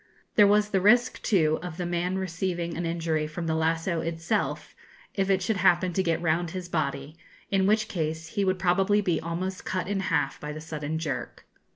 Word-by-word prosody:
There 205 -2 +6
was 210 +1 +3
the 190 - +2
risk 240 +5 +4
too 160 -6 +2
of 175 -2 -7
the 180 - -2
man 175 +2 -1
receiving 175 -2 -2
an 170 0 -2
injury 165 -2 -1
from 165 +3 -5
the 160 - 0
lasso 165 +1 0
itself, 165 0 -2 0.4
if 195 -1 0
it 190 -1 +2
should 210 +2 0
happen 180 -1 +3
to 190 - +1
get 165 -3 0
round 170 +1 +1
his 180 +1 -6
body, 145 -2 -3 0.3
in 195 -1 +3
which 215 +1 +2
case 160 -3 -3
he 200 +1 -1
would 185 -1 +1
probably 190 +3 +3
be 175 -5 0
almost 180 +3 -4
cut 185 -1 -2
in 200 0 -1
half 155 -7 0
by 150 0 -5
the 155 - -7
sudden 155 -1 -4
jerk. 135 -7 -4
175 Hz, 200 wpm, -27 LUFS, 160-190 Hz, 0.4 s, There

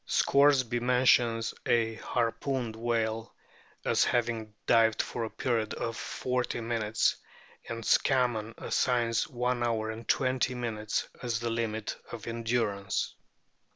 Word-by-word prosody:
Scoresby 135 -4 +4
mentions 120 -2 +3
a 115 -1 +2
harpooned 115 +1 -2
whale 115 -1 -1 0.5
as - - +3
having 115 -2 0
dived 115 -2 +4
for 115 - -2
a - - -5
period 115 -3 -1
of 115 -1 -3
forty 125 0 -2
minutes, 115 -2 0 0.5
and 115 0 -4
Scammon 120 -5 +2
assigns 120 -3 +1
one 125 0 -1
hour 110 -2 0
and 115 +1 -9
twenty 130 -1 +1
minutes 110 -3 -2
as 120 -2 -1
the 120 0 -2
limit 110 -2 -2 0.2
of 115 -3 -7
endurance. 115 -4 -1
115 Hz, 120 wpm, -29 LUFS, 110-125 Hz, 0.5 s, Scoresby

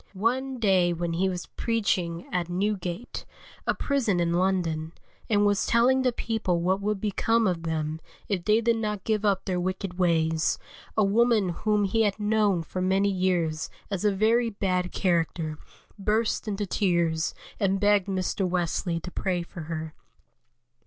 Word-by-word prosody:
One 255 +6 0
day 190 -6 +3
when 170 0 -2
he 190 +3 +1
was 180 -1 -4
preaching 185 -7 -1
at 175 -1 -1
Newgate, 185 +2 -2 0.4
a - - +2
prison 250 -10 0
in 170 0 +1
London, 170 -3 0 0.4
and 205 -2 +3
was 205 -1 +2
telling 250 +3 +4
the 255 -1 +2
people 220 -7 -1
what 190 +3 +1
would 210 0 -1
become 225 +3 +1
of 180 -4 0
them 160 -1 -2 0.3
if 190 -4 -1
they 215 +4 +3
did 230 0 +2
not 210 -3 -2
give 215 -1 0
up 195 -2 +1
their 180 -2 -1
wicked 185 0 -3
ways, 160 -2 +2 0.4
a 215 - +5
woman 215 -1 +3
whom 210 +4 +1
he 215 +3 +1
had 205 -1 +1
known 210 -4 +2
for 185 +3 -5
many 195 +2 +2
years 175 -4 0 0.2
as 195 -1 -2
a 210 - +4
very 225 +4 +2
bad 185 -3 -1
character, 165 -3 0 0.4
burst 215 +3 0
into 205 0 -2
tears 170 -4 0 0.2
and 195 -2 +1
begged 205 -1 +3
Mr. 190 0 -1
Wesley 175 -1 -1
to 180 - -7
pray 180 -2 -1
for 170 0 -9
her. 160 -1 -4
190 Hz, 160 wpm, -27 LUFS, 175-210 Hz, 0.4 s, a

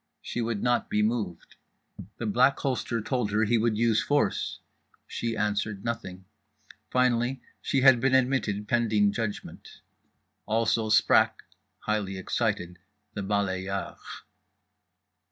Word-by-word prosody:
She 120 - -3
would 115 -3 -2
not 120 -1 +1
be 105 - +1
moved. 105 -6 -3 0.6
The 120 - -4
Black 125 +6 +3
Holster 125 -3 -1
told 125 -1 -1
her 105 +2 +1
he 115 +1 +2
would 110 -1 +1
use 115 -1 +3
force—she 120 -4 -3
answered 105 -1 -2
nothing. 95 -6 -5 0.6
Finally 125 0 +1 0.2
she 135 - 0
had 130 -2 +7
been 130 +2 +2
admitted 125 -6 +1
pending 110 -4 +2
judgment. 105 0 -6 0.7
Also 110 0 +1
sprach, 110 +1 +4 0.5
highly 105 -3 -2
excited, 95 -3 -2 0.3
the 100 - -4
balayeur. 95 -1 -2
110 Hz, 115 wpm, -27 LUFS, 100-120 Hz, 0.7 s, had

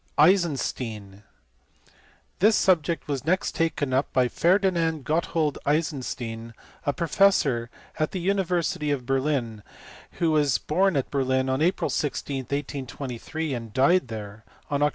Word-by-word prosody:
Eisenstein. 130 - +1 1.2
This 215 +3 +5
subject 170 -3 +2
was 140 -3 -2
next 185 +5 0
taken 150 -5 -1
up 135 +2 +1
by 125 -1 +3
Ferdinand 170 -4 +1
Gotthold 155 -1 0
Eisenstein, 125 -7 -2 0.3
a - - +4
professor 150 -7 +2 0.3
at 155 - +1
the 185 - -4
university 180 -5 0
of 140 -4 -1
Berlin, 130 -5 -1 0.5
who 165 -2 +1
was 145 -3 +3
born 185 +1 +1
at 135 - -2
Berlin 130 -1 +1
on 130 +2 0
April 180 +4 +1
16, 140 -1 -2
1823, 140 +2 -4
and 115 -3 -6
died 135 - +3
there 110 -1 -8 0.3
on 140 - +1
Oct. 145 - +4
145 Hz, 130 wpm, -25 LUFS, 130-165 Hz, 1.2 s, This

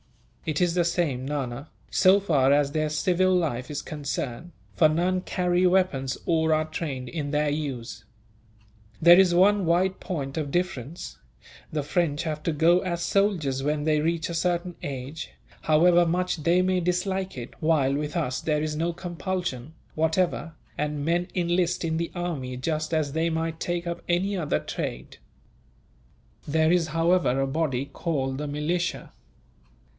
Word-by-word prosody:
"It 155 -2 0
is 175 -2 +2
the 175 0 +2
same, 165 -7 0
Nana, 135 -1 -4 0.2
so 190 +2 +5
far 145 -9 +2
as 140 0 +3
their 155 0 0
civil 185 +4 +2
life 145 -8 -1
is 150 - -4
concerned; 145 +1 -4 0.2
for 155 - +5
none 180 +4 +1
carry 180 0 +1
weapons 175 -8 +1
or 160 -1 +2
are 155 0 0
trained 150 -5 -4
in 150 0 -4
their 150 0 +1
use. 125 -8 -4 1.0
There 175 +2 +8
is 180 -2 +4
one 195 0 +4
wide 185 +3 +2
point 140 -6 -4
of 150 -3 -2
difference. 170 -1 -3 0.5
The 150 -2 -1
French 155 0 0
have 155 -2 -3
to 165 - 0
go 165 +4 +4
as 175 -2 -3
soldiers 170 -11 +1
when 145 +1 -1
they 155 -1 +2
reach 165 +1 0
a 170 - -5
certain 175 +1 -1
age, 140 +2 -6 0.3
however 170 +3 +5
much 180 +2 0
they 170 +4 +2
may 185 0 +1
dislike 185 0 -1
it; 120 0 -7
while 155 -4 +2
with 150 +4 -2
us 130 -6 -1
there 150 -1 0
is 155 -1 -2
no 165 +2 -1
compulsion, 175 -5 -4 0.2
whatever, 160 +1 0 0.2
and 150 -1 -2
men 175 +2 +1
enlist 175 0 +1
in 160 -1 -1
the 170 0 -2
army 150 -8 -3
just 155 +3 -2
as 150 -3 0
they 165 +1 +1
might 160 0 -2
take 175 0 -2
up 170 0 -4
any 190 +4 +1
other 165 -6 0
trade. 60 - -5 1.3
There 160 +2 +3
is, 175 -2 +2
however, 165 -4 +2
a 135 - +2
body 135 -2 -1
called 135 -4 -2
the 150 - -3
militia. 155 +5 -2
160 Hz, 160 wpm, -26 LUFS, 145-175 Hz, 1.3 s, There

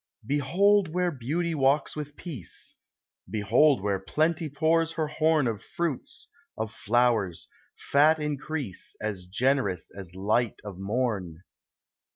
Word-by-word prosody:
Behold 180 - +3
where 180 +1 +1
Beauty 160 +6 -2
walks 140 0 +2
with 145 -1 -6
Peace! 140 - -7 0.5
Behold 115 +4 +3
where 100 -2 +1
Plenty 155 - 0
pours 165 +3 +2
her 160 - 0
horn 155 -1 +2
Of 110 -4 -2
fruits, 170 -6 -3 0.3
of 110 -2 -3
flowers, 110 -6 +1 0.3
fat 150 +3 +4
increase, 150 - -4
As 100 -4 -4
generous 110 -4 0
as 95 -3 -9
light 105 +4 +1
of 100 -3 -8
morn. 100 -6 -2
135 Hz, 120 wpm, -27 LUFS, 105-155 Hz, 0.5 s, fat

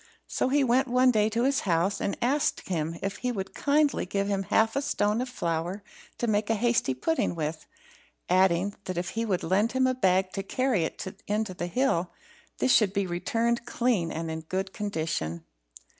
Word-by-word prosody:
So - - -1
he 285 +1 +3
went 260 +2 +3
one 255 +1 +4
day 215 -2 +2
to 230 +2 0
his 275 +1 +2
house, 185 +2 0
and 200 - -1
asked 275 +4 0
him 165 -2 -2
if 195 0 -2
he 250 - -2
would 195 -4 -5
kindly 290 -6 +1
give 200 +1 -1
him 200 -1 0
half 220 +3 +2
a 275 - +1
stone 210 -4 0
of 255 - -3
flour 175 -2 -2 0.3
to - - -1
make 210 -1 0
hasty 225 - +1
pudding 310 - 0
with; 155 0 -4 0.6
adding, 185 +1 +3
that 185 -2 -4
if 175 +1 -2
he 230 +1 -2
would 190 -5 -1
lend 205 +7 +1
him 260 0 +3
a 255 - +2
bag 190 -5 +2
to 195 - -2
carry 230 -3 0
it 190 +5 -7
in 210 +2 +1
to 200 -4 -6
the 175 -1 -4
hill, 180 -5 +1 0.5
this 260 - +3
should 205 -4 +4
be 200 -1 0
returned 230 +7 -1
clean 225 -9 +1
and 165 0 -4
in 160 0 -4
good 190 +4 -3
condition. 155 - -3
200 Hz, 195 wpm, -27 LUFS, 175-240 Hz, 0.6 s, one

